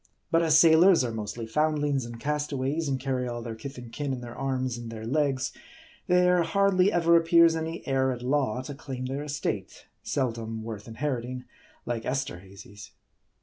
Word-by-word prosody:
But 165 - +4
as 160 -2 +5
sailors 165 0 +6
are 120 - -2
mostly 110 +1 -5
foundlings 145 0 0
and' 120 -1 -9
castaways, 145 +1 -1
and 135 -2 -1
carry 130 -1 -2
all 120 -1 -4
their 115 -1 -5
kith 135 +5 -8
and 120 -2 -9
kin 145 0 -2
in 125 - -5
their 120 -1 -8
arms 130 -2 -2
and 120 -1 -7
their 110 -1 -7
legs, 135 0 0 0.5
there 180 -1 +4
hardly 195 +1 +3
ever 170 -2 +4
appears 165 0 +5
any 160 +1 -4
heir 130 -1 +1
at 125 -1 -5
law 130 -2 0
to 145 - -6
claim 130 -2 -6
their 135 +2 -3
estate; 145 - -4 0.2
seldom 115 -4 -2
worth 110 -2 -7
inheriting, 125 0 -4 0.4
like 115 -2 -3
Esterhazy's. 100 -5 -6
135 Hz, 170 wpm, -27 LUFS, 120-155 Hz, 0.5 s, sailors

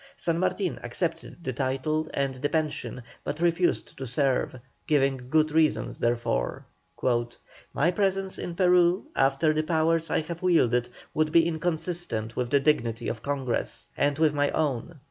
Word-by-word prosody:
San 170 -1 0
Martin 185 0 -1
accepted 165 0 -3
the 130 - -2
title 135 +5 -1
and 140 -1 0
the 135 +3 -2
pension, 155 -5 -2 0.2
but 150 - -4
refused 175 +1 +1
to 135 - -4
serve, 130 0 0 0.3
giving 135 -4 +1
good 155 +1 +3
reasons 155 0 +1
therefor: 120 - -1 1.1
"My 165 +5 +2
presence 195 0 0
in 170 - -5
Peru 180 0 +4
after 135 +4 +3
the 155 - +1
powers 165 +1 +1
I - - +1
have 170 +2 -7
wielded 125 -10 +3 0.2
would 155 0 +1
be 165 0 +5
inconsistent 165 -8 -2
with 125 -1 -1
the 140 - +4
dignity 120 -5 +1
of 115 - -5
Congress, 130 - -3
and 145 0 +1
with 155 -2 +3
my 145 -1 +2
own. 150 +1 -2
155 Hz, 150 wpm, -27 LUFS, 135-170 Hz, 1.1 s, be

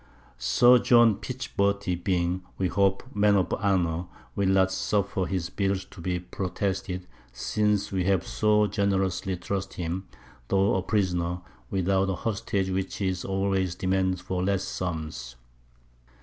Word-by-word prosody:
Sir 120 - +6
John 120 -4 +5
Pichberty 100 -7 -1
being, 90 0 0 0.2
we 95 -2 0
hope, 95 +2 +2
a 130 +2 -18
Man 105 0 +4
of 90 -4 +1
Honour, 90 -4 +1 0.3
will 100 -1 +1
not 95 -1 +4
suffer 100 -2 0
his 90 -2 -2
Bills 95 -1 -1
to 90 - -11
be 90 +1 -1
protested, 95 0 -3 0.3
since 105 - 0
we 95 -2 0
have 95 -2 +2
so 105 0 +3
generously 95 -2 0
trusted 95 +2 -4
him, 90 +3 -3 0.4
tho' 95 +1 +3
a 95 - +1
Prisoner, 90 -3 0 0.3
without 95 +1 +1
a 95 - 0
Hostage, 100 -2 -1
which 95 0 -2
is 95 -2 -1
always 95 -2 0
demanded 95 0 0
for 90 -1 -2
less 100 0 +1
Sums. 80 -10 -4
95 Hz, 140 wpm, -27 LUFS, 90-100 Hz, 0.4 s, Sir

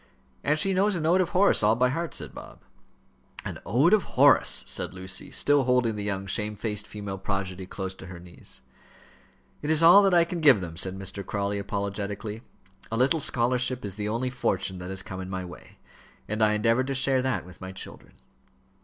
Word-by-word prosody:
"And 150 +2 +2
she 195 +5 +1
knows 195 +2 +2
an 160 -3 -2
ode 180 +3 +4
of 175 - -1
Horace 195 +2 +3
all 110 +1 +4
by 125 +2 +2
heart," 165 +5 -3
said - - -6
Bob. - - -11 0.8
"An - - -5
ode 135 - +4
of 210 -4 +1
Horace!" - - +5
said - - -2
Lucy, 95 0 -3
still 145 -2 +3
holding 125 -3 +2
the 105 - -4
young 95 -1 -2
shamefaced 105 +1 -2
female 100 -2 -6
prodigy 95 -1 -3
close 95 0 -5
to 95 - -12
her 90 -1 -9
knees. 85 0 -7 1.0
"It 150 - -4
is 160 +1 +3
all 175 +5 +9
that 195 -2 +3
I 170 - +6
can 170 0 -5
give 140 -8 +7
them," 85 -3 -6
said 95 +2 -3
Mr. 95 +1 -6
Crawley, 100 +1 -2
apologetically. 100 +1 -4 0.5
"A 115 - -1
little 135 +7 +3
scholarship 125 -2 0
is 100 - -5
the 105 +1 -4
only 125 +3 -1
fortune 95 -6 -1
that 90 +1 -7
has 95 -1 -4
come 95 0 -7
in 95 - -7
my 95 -1 -4
way, 90 - -13 0.5
and 110 +1 -3
I 105 0 +4
endeavour 115 +4 +2
to 135 0 -3
share 130 0 +3
that 130 -1 -1
with 90 -1 -15
my 95 0 -6
children." 95 - -9
105 Hz, 200 wpm, -26 LUFS, 95-135 Hz, 1.0 s, all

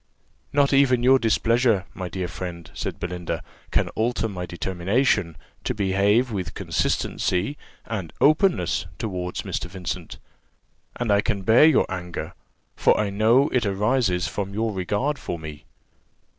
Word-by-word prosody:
"Not 140 0 +3
even 130 -3 +4
your 130 +1 +6
displeasure, 115 -2 +2
my 90 -2 -5
dear 90 +1 -3
friend," 85 -2 -7
said - - -5
Belinda, 90 -1 -4 0.3
"can - - +1
alter 115 0 -1
my 90 -4 -5
determination 95 - 0 0.3
to - - -2
behave 100 +5 +2
with 95 -4 -4
consistency 95 +11 -1 0.3
and 95 -8 -4
openness 160 +5 +3
towards 90 -5 -4
Mr. - - -3
Vincent; 90 -1 -6 0.8
and 120 -3 -1
I 100 0 +4
can 100 -3 -2
bear 115 +9 +6
your 160 - +5
anger, 90 -2 -5 0.4
for - - +3
I 105 -2 0
know 115 +8 +4
it 125 - +1
arises 100 -2 +1
from 100 -1 -4
your 110 0 0
regard 105 +10 -1
for 85 - -4
me." 80 -2 -9
100 Hz, 140 wpm, -24 LUFS, 90-120 Hz, 0.8 s, your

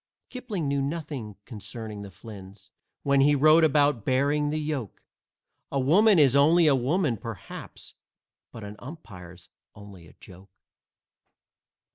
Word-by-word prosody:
Kipling 220 - -4
knew 140 0 0
nothing 140 -7 -5
concerning 110 -1 -7
the 100 - -9
Flynns 95 0 -13 0.3
When 140 -1 +3
he 145 +1 +4
wrote 155 +3 +5
about 145 -6 +2
"bearing 145 +4 +1
the 155 - -2
yoke." 150 - -5 0.7
A 140 - -1
woman 190 +10 +4
is 140 -4 +5
only 160 +4 +5
a 150 - +5
woman, 135 0 0
perhaps, 110 -3 -9 0.6
But 115 - -10
an 105 +1 -9
umpire's 90 - -12 0.3
only 100 -4 -13
a - - -18
joke. 95 +2 -15
135 Hz, 130 wpm, -26 LUFS, 105-150 Hz, 0.7 s, wrote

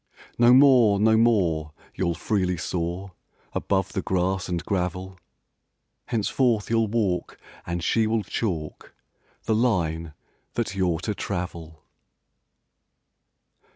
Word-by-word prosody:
No 120 0 +6
more, 125 -6 +6
no 110 +1 +4
more 90 -10 +2 0.2
you'll 85 -2 -1
freely 90 -3 -1
soar 90 +3 -3 0.4
Above 95 -1 -1
the 95 - -1
grass 95 +1 -1
and 85 -1 -3
gravel: 95 -1 -3 0.9
Henceforth 115 -1 0
you'll 115 -1 +2
walk 100 -5 -1 0.3
and 85 0 -3
she 110 +4 +2
will 110 -1 0
chalk 90 -6 -4 0.5
The 110 - 0
line 85 -9 0 0.4
that 115 -5 -1
you're 90 -4 0
to 105 - -2
travel! 85 -5 -6
95 Hz, 110 wpm, -25 LUFS, 85-110 Hz, 0.9 s, No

